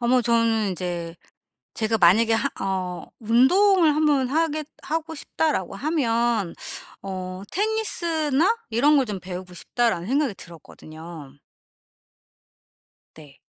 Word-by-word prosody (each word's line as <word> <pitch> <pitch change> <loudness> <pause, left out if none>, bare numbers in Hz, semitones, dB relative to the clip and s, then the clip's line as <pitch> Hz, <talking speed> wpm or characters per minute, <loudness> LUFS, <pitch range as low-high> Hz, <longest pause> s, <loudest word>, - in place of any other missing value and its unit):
아 235 - -1
뭐 250 0 +4
저는 230 -3 +2
이제 175 -2 -4 0.6
제가 225 0 0
만약에 215 +6 +5
하 265 +5 +1
어 185 -2 -3
'운동을 310 - +4
한번 295 -4 +2
하겠 310 0 0 0.2
하고 320 +1 -3
싶다.'라고 285 - -2
하면 235 - 0 0.5
어 185 -1 -6
'테니스나 360 - 0
이런 285 +6 +4
걸 265 - +3
좀 205 -3 -5
배우고 180 0 -8
싶다.'라는 210 -2 -1
생각이 270 -2 +1
들었거든요. 160 -3 -12 1.8
네. 150 -3 -15
230 Hz, 235 characters per minute, -24 LUFS, 185-300 Hz, 1.8 s, 만약에